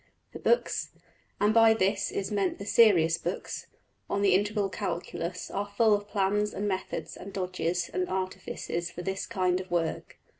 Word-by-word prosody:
The - - -7
books 480 - +1 0.5
and 210 +1 +3
by 225 -1 +6
this 200 -1 +1
is 195 +2 -3
meant 200 -3 0
the 200 - -7
serious 175 -7 +5
books 175 +3 -4 0.4
on 200 0 0
the 195 -2 +5
Integral 205 +1 +2
Calculus 175 -1 -4
are 205 +1 -3
full 225 -2 +5
of 205 0 0
plans 210 +1 0
and 205 - -1
methods 190 -1 -3
and 200 - -9
dodges 180 -2 -1
and 180 0 -2
artifices 185 -2 -3
for 175 - -7
this 190 0 -3
kind 185 -1 +1
of 185 - -11
work. 170 -2 -2
190 Hz, 165 wpm, -29 LUFS, 180-205 Hz, 0.5 s, by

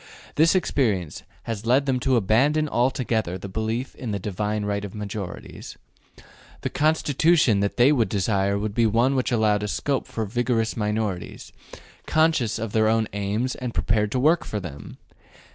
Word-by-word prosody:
This 165 +4 +4
experience 105 - 0 0.2
has 115 -1 -5
led 130 +3 +3
them 130 -2 0
to 130 +1 +1
abandon 135 +9 +2
altogether 120 -8 0
the 95 - -8
belief 110 +6 -3
in 125 - -7
the 100 - -1
divine 105 +2 -3
right 100 0 -2
of 100 0 -7
majorities. 100 -3 -7 0.8
The - - -3
Constitution 150 -5 +2
that 100 0 -1
they 125 +4 +6
would 120 -7 +2
desire 100 -1 0
would 105 0 -3
be 115 +1 +3
one 120 +5 +2
which 130 -2 0
allowed 105 -3 +1
scope 140 +5 -1
for 110 - -3
vigorous 115 +1 -1
minorities, 105 -4 -3 0.5
conscious 155 -8 +2
of 115 -1 -4
their 110 0 +2 0.3
aims 105 +5 -1
and 125 -2 -6
prepared 105 -1 +1
to 130 - +1
work 160 +5 +3
for 105 - -4
them. 75 -7 -9
110 Hz, 160 wpm, -24 LUFS, 105-130 Hz, 0.8 s, they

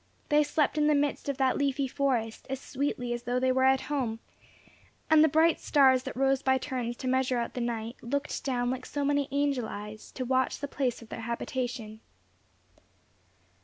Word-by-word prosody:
They 300 -1 +5
slept 300 0 +1
in 300 - +3
the 300 - +4
midst 285 0 0
of 275 - -2
that 265 0 +2
leafy 275 -1 +1
forest 250 -5 -1
as 270 0 -3
sweetly 255 -3 -2
as 240 - -4
though 245 +1 -1
they 260 0 +2
were 260 0 +3
at 265 0 +4
home, 250 -7 -2 0.9
and 315 -1 +7
the - - +6
bright 320 +2 +3
stars 265 -3 +4
that 265 +1 -7
rose 270 0 +2
by 265 -1 +3
turns 250 -3 -3
to 260 - -5
measure 260 -1 +1
out 235 -1 -2
the 250 - -3
night, 230 0 -3
looked 280 +5 -3
down 245 -2 0
like 255 0 -5
so 285 -1 -2
many 285 -1 +1
angel 280 -4 0
eyes, 210 +1 -8
to 255 - -4
watch 260 0 +1
the 285 - -4
place 255 -5 -2
of 225 - -16
their 230 - -6
habitation. 235 -1 -4
260 Hz, 195 wpm, -29 LUFS, 245-280 Hz, 0.9 s, and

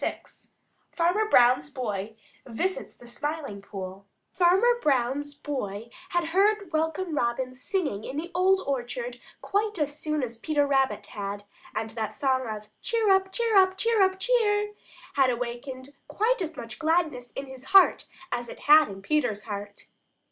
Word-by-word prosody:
VI - - -2 0.7
FARMER 360 +6 +1
BROWN'S 250 - +5
BOY 220 -6 -4 0.3
VISITS 345 +11 -3
THE 245 - -16
SMILING 280 -3 -5
POOL 195 0 -8 0.2
Farmer 385 +7 +4
Brown's 280 +1 0
boy 230 -7 -5 0.2
had 345 -2 0
heard 400 +1 +2
Welcome 320 +2 -1
Robin 255 -1 -1
singing 270 - -2
in 270 - -6
the 340 +3 -4
Old 375 +2 +3
Orchard 280 - -3 0.2
quite 415 0 0
as 295 -1 -2
soon 305 -2 -1
as 235 -2 -5
Peter 295 +1 +1
Rabbit 270 -1 +1
had, 205 -2 -5 0.3
and 220 0 -2
that 220 -2 -4
song 260 -2 +1
of 215 -1 -6
"Cheer 450 -3 +2
up! 385 0 +3
Cheer 460 +1 0
up! 380 -1 +5
Cheer 455 +1 +2
up! 380 0 +3
Cheer!" 420 -2 +2 0.4
had 270 -2 +4
awakened 250 +3 -5
quite 455 +2 +1
as 325 -3 -4
much 230 -1 -8
gladness 315 -6 0
in 275 - -5
his 265 -1 -11
heart 385 0 +5 0.2
as 240 -1 -3
it - - -10
had 305 -2 +7
in 195 -1 -9
Peter's 230 -5 0
heart. 205 -1 -7
290 Hz, 155 wpm, -27 LUFS, 240-375 Hz, 0.7 s, had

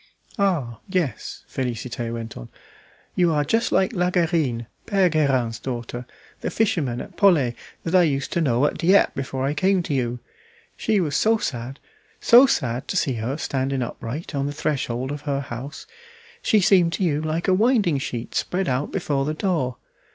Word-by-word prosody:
"Ah! 150 - 0
yes," 175 - -2
Félicité 120 -2 -3
went 115 -1 -6
on, - - -9 0.6
"you 175 -2 +3
are 150 -2 +2
just 225 +11 +1
like 190 +4 +2
La 180 -3 +1
Guerine, 160 -10 0 0.2
Pere 195 -3 +3
Guerin's 130 -8 +1
daughter, 120 -1 -5 0.3
the - - -3
fisherman 155 - 0
at - - -9
Pollet, 155 - +4 0.3
that 165 - -3
I 185 - +7
used 140 -5 0
to 170 - +1
know 130 -2 +2
at - - -1
Dieppe 185 +4 +4
before 135 -1 -3
I 140 - 0
came 185 +4 +2
to 150 - -3
you. 125 -2 -1 0.6
She 215 -2 +1
was 155 -6 -1
so 225 +1 +3
sad, 130 - -4 0.4
so 250 +3 +7
sad, 125 - -1
to - - -1
see 135 - +1
her 130 +6 -2
standing 135 -3 -1
upright 120 +7 -6
on 140 -1 -1
the 145 - -3
threshold 135 -4 -2
of 145 0 -5
her 140 0 0
house, 135 +2 -7 0.6
she 215 - +3
seemed 180 -3 +4
to 195 - -1
you 150 -4 +1
like 160 +3 -2
a 190 - +4
winding 205 - +3
sheet 120 -3 -5
spread 185 +1 -1
out 130 +3 -1
before 145 -7 -1
the 155 +1 -2
door. 155 - -1
145 Hz, 180 wpm, -23 LUFS, 125-180 Hz, 0.6 s, I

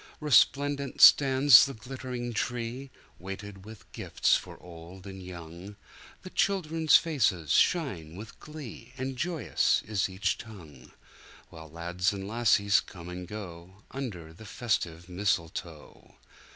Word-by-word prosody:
Resplendent 140 -1 +2
stands 135 -2 +8
the 135 - -7
glitt'ring 125 +1 -6
tree, 120 +4 -4 0.3
Weighted 95 +1 -9
with 110 -1 -13
gifts - - +1
for - - -6
old 90 +2 -13
and 95 -1 -9
young, 90 +2 -10 0.5
The 185 - -10
children's 165 -5 +3
faces 110 - 0
shine 95 - +1
with 105 +3 -11
glee, 135 -5 -10
And 130 0 -4
joyous 165 +3 0
is 100 -2 -1
each 95 +1 -2
tongue, 80 - -13 0.6
While 80 -1 -11
lads 85 +3 -2
and 95 -1 -6
lassies 105 -3 +3
come 90 -3 -11
and 90 0 -7
goUnder 95 0 -8
the 110 - -13
festive 90 -9 -2
mistletoe. 85 -4 -4
105 Hz, 120 wpm, -28 LUFS, 90-130 Hz, 0.6 s, stands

